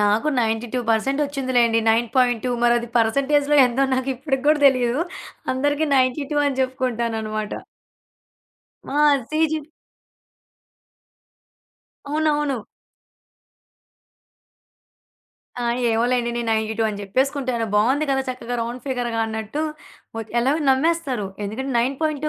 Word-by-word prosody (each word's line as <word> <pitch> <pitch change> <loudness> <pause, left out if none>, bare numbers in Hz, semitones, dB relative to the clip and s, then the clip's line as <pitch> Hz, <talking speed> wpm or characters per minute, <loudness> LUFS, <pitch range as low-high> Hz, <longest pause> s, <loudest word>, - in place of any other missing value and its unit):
నాకు 210 +7 +2
92 225 +2 -1
పర్సంట్ 270 +6 +1
ఒచ్చిందిలెండి 255 -5 +1
9.2 240 +1 +1
మరది 240 0 +2
పర్సంటేజ్‌లో 280 +5 +2
ఎంతో 250 +3 +1
నాకు 260 +1 -1
ఇప్పుడికి 270 +1 -2
గూడా 305 -1 +4
తెలీదు. 255 0 +2 0.5
అందరికి 290 +4 0
92 275 +3 +1
అని 275 -2 -1
జెప్పుకుంటాననమాట. 230 -5 -2 1.4
ఆ! - - -5 0.4
సీజీ 315 0 +1 2.5
అవునవును. 295 -3 0 3.0
ఆ! - - -2 0.3
ఏమోలెండి. 240 +1 +1
నేను 235 -1 -2
92 220 0 0
అని 205 -1 -5
జెప్పేసుకుంటాను. 255 +2 -1
బావుంది 255 +9 +3
గదా! 270 0 +1
చక్కగా 250 -1 -4
రౌండ్ 235 +2 -4
ఫిగర్‌గా 245 -3 -2
అన్నట్టు 220 +5 -4 0.6
వ - - -2 0.2
ఎలాగో 270 +6 +1
నమ్మేస్తారు. 270 -5 0 0.2
ఎందుకంటే, 230 +7 -4
9.2 290 +4 -1
255 Hz, 95 wpm, -22 LUFS, 230-280 Hz, 3.0 s, గూడా